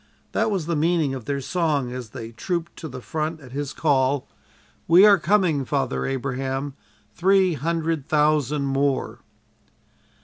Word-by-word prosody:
That - - +1
was 190 -6 -1
the 170 0 -1
meaning 160 -2 +1
of 130 -4 -6
their 140 +1 -2
song 145 -5 0
as 125 -3 -6
they 115 -1 -8
trooped 170 +8 -3
to 160 - -6
the 130 -3 -9
front 155 +1 -3
at 130 -4 -13
his 140 +1 -4
call: 140 -3 +1 0.6
"We 175 +5 +8
are 200 -2 +7
coming, 175 -6 +2
Father 135 -1 -1
Abraham; 135 +1 -3 0.4
Three 190 - +3
hundred 160 0 -2
thousand 150 -2 +2
more." 135 0 0
145 Hz, 145 wpm, -23 LUFS, 135-165 Hz, 0.6 s, We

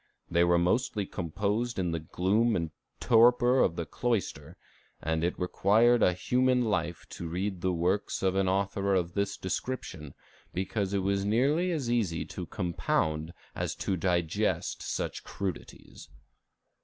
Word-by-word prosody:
They 85 +1 +4
were 85 0 +4
mostly 100 +4 +1
composed 100 +7 -2
in 90 -3 0
the 80 - -1
gloom 100 +8 +1
and 85 -2 -2 0.3
torpor 120 +2 +5
of 85 - +3
the 85 - -3
cloister, 115 -2 -2 0.4
and 80 0 -1
it 85 - 0
almost - - -16
required 110 +6 +3
a 90 - +4
human 125 +6 +2
life 85 -6 -1
to 85 - -6
read 90 +2 -3
the 95 - +1
works 90 +5 0
of 95 -1 +2
an 95 0 +1
author 100 0 +1
of 85 -2 0
this 100 -1 -1
description, 95 - -5 0.4
because 95 +1 -1
it 95 - 0
was 100 0 +1
nearly 140 - +2
as 150 -7 -2
easy 100 -9 0
to - - -5
compound 80 -2 -1 0.2
as - - -3
to 95 - -1
digest 85 -2 0
such - - -3
crudities." 95 -4 -7
95 Hz, 150 wpm, -29 LUFS, 85-115 Hz, 0.4 s, torpor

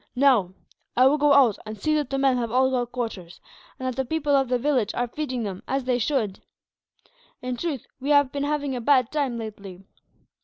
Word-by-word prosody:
"Now, 245 -9 +3 0.4
I 255 - +6
will 290 +3 +4
go 295 0 +4
out 260 -7 +4
and 215 -1 -8
see 310 +9 0
that 295 -4 0
the 275 - -2
men 270 -1 +3
have 235 -2 -2
all 260 +3 +2
got 245 -2 -1
quarters, 225 -8 -5 0.4
and 260 - -4
that 255 - -2
the 265 - 0
people 295 +1 0
of 270 -1 +2
the 250 - +2
village 250 -5 0
are 245 0 0
feeding 255 -2 -4
them, 195 -3 -5
as 270 0 -1
they 250 -1 0
should. 220 -6 -1 1.0
In 250 0 -2
truth, 285 -2 -4
we 270 +2 -4
have 285 -2 +4
been 285 0 -3
having 290 -2 -1
a 245 - -4
bad 255 -1 +3
time, 280 -6 -1
lately." 200 -4 -8
255 Hz, 215 wpm, -24 LUFS, 230-280 Hz, 1.0 s, I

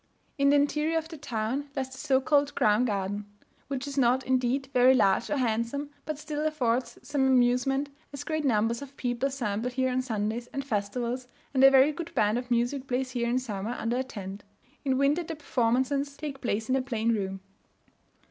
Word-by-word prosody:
In 280 0 +5
the 285 - +5
interior 300 +3 +2
of 320 0 -3
the 330 - -7
town 260 +2 -2
lies 265 -1 -2
the 265 - -10
so 265 -1 +2
called 285 +1 +2
"crown 215 +3 +3
garden," 205 -1 -2 0.4
which 270 -1 -3
is 280 0 -2
not, 255 +1 +3
indeed, 260 +1 +1
very 255 +1 +6
large 195 -6 +3
or 295 - 0
handsome, 245 +4 -1 0.2
but 310 -2 -2
still 300 0 -4
affords 255 -5 0
some 270 -2 +1
amusement, 260 +2 +3 0.2
as 280 - -6
great 315 -1 -2
numbers 230 -2 +1
of 280 0 -10
people 245 +1 -1
assemble 240 -4 -2
here 260 +1 0
on 255 +1 +1
Sundays, 225 -1 -2
and 275 +1 -5
festivals, 240 +3 -2 0.3
and 265 -1 +3
a 270 - +11
very 270 +2 +6
good 335 +2 -7
band 215 +3 +2
of 250 0 -8
music 245 +3 0
plays 255 0 -1
here 235 -2 -1
in 245 - +2
summer 225 -2 -3
under 235 +2 -1
a 260 - 0
tent; 200 -5 -8 0.4
in 265 -3 +1
winter 280 +5 +3
the 330 -1 -5
performances 275 +1 0
take 285 -3 -6
place 220 -2 -1
in 260 - +2
a 265 - +2
plain 230 -3 0
room. 195 -3 -2
255 Hz, 195 wpm, -28 LUFS, 235-280 Hz, 0.4 s, a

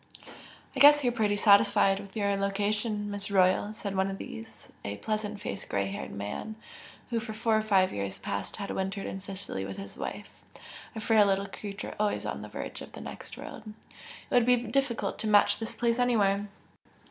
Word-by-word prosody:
"I - - -2
guess 290 0 +8
you're 245 -1 +2
pretty 210 -3 +1
satisfied 200 -1 +5
with 200 -1 -11
your 200 -1 +1
location, 205 +1 -1
Miss 205 0 -3
Royal" 190 +1 +3
said 200 -2 -4
one 190 0 +1
of 195 - -4
these, 225 +2 -9 0.2
a 100 0 -4
pleasant 215 - -3
faced 100 - -6
grey 100 -1 0
haired 100 - -5
man, 105 - -5 0.6
who 230 - +1
for 220 0 -6
four 225 0 +1
or 215 - +3
five 195 -3 +3
years 100 -1 -3
past 100 0 -4
had 200 -2 -5
wintered 195 +1 -2
in 190 - -4
Sicily 195 - -5
with 95 0 -6
his 100 0 -8
wife, - - -5 0.6
a - - -3
frail 215 -1 +4
little 195 0 +1
creature 200 0 -6
always 210 -1 0
on - - -3
the - - -8
verge - - -6
of - - -10
the - - -8
next - - -8
world - - -8
"It 215 +1 -13
would 245 -1 +6
be 250 - +7
difficult 245 +1 -1
to 220 - -2
match 205 -1 +5
this 225 0 -5
place 235 0 +1
anywhere! 205 -5 +2
205 Hz, 195 wpm, -29 LUFS, 195-220 Hz, 0.6 s, guess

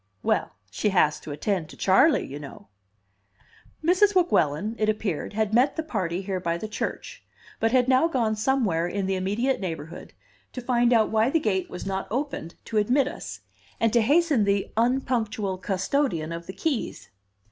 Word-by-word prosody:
"Well, - - 0 0.2
she 210 - 0
has 155 -6 +2
to 150 - -9
attend 165 +2 -2
to - - -13
Charley, 260 - +4
you 140 +2 -7
know!" 140 -7 -11 1.2
Mrs. 380 +4 +4
Weguelin, 215 - +2
it 215 0 +2
appeared, 210 -5 -2
had 215 0 -1
met 255 +5 +3
the 320 - -2
party 190 - -2
here 190 -1 -2
by 170 -1 -1
the 215 - -5
church, 215 - -5 0.4
but 225 0 +2
had 255 -1 +3
now 260 +5 +4
gone 235 -8 0
somewhere 215 -8 +1
in 195 +2 -2
the 190 - 0
immediate 205 +8 0
neighborhood 165 -4 -6 0.4
to - - -5
find 240 -1 +2
out 225 -3 +3
why 220 +2 +3
the 325 - +2
gate 195 -8 -1
was 180 - -7
not 195 0 -3
opened 255 - -3
to 220 - -3
admit 250 +6 +3
us, - - -7 0.4
and 230 -1 +2
to 235 - +5
hasten 290 0 +3
the 200 0 0
unpunctual 225 -5 0
custodian 190 - -1
of 170 0 -6
the 190 - -6
keys. 280 +3 -3
215 Hz, 175 wpm, -25 LUFS, 185-255 Hz, 1.2 s, to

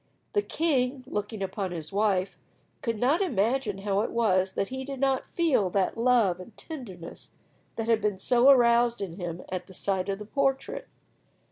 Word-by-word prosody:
The 415 - +3
king, 270 -8 0
looking 210 -4 -4
upon 190 0 -3
his 160 0 -6
wife, 195 -2 +1 0.5
could 230 -3 -1
not 275 - +2
imagine 235 - 0
how 200 0 0
it 225 - -1
was 190 -5 +2
that 195 - -1
he 265 0 -4
did 275 0 -6
not 270 -1 +1
feel 295 - +2
that 190 0 0
love 230 -7 +3
and 205 +4 -12
tenderness 200 - -9 0.4
that 225 -1 -3
had 225 -1 +3
been 205 -2 0 0.2
aroused 240 -2 +5
in 180 -3 -5
him 175 -2 -5
at 180 -1 -4
the 190 - -10
sight 190 0 -1
of 195 - -1
the 210 - -8
portrait. 270 +3 -1
220 Hz, 170 wpm, -27 LUFS, 195-255 Hz, 0.5 s, aroused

